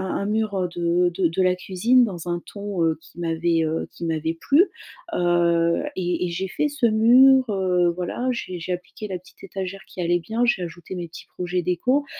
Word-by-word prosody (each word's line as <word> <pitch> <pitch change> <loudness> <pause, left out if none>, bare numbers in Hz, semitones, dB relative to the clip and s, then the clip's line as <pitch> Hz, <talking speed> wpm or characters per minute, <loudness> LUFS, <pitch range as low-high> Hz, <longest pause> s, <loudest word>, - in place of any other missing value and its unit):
un 200 - -2
mur, 215 -1 0
heu, 185 -2 0
de 175 +1 +2
de 175 0 +1
de 165 +3 -1
la 185 0 +3
cuisine 225 +8 +3
dans 175 -5 -6
un 175 - -1
ton, 200 -4 -3
heu, 160 -1 +1
qui 170 - -15
m'avait, 165 0 +1
heu, 160 +1 -2
qui 170 - -7
m'avait 160 0 -1
plu 290 +5 +5 0.5
heu 170 +1 +2
et 180 -1 -1
et 175 - -2
j'ai 185 +3 -3
fait 300 - 0
ce 280 -4 -1
mur, 250 +3 +6
heu, 180 -3 +2
voilà, 180 +8 -3
j'ai 185 -7 -5
j'ai 180 +2 -3
appliqué 180 +4 -7
la 185 -2 -4
petite 185 - -20
étagère 195 0 -5
qui 185 - -7
allait 175 0 +2
bien, 225 +8 -1
j'ai 215 -6 +1
ajouté 175 +2 -8
mes 175 -1 -5
petits 165 - -12
projets 180 0 -2
déco, 250 +12 +1
180 Hz, 205 wpm, -23 LUFS, 170-210 Hz, 0.5 s, mur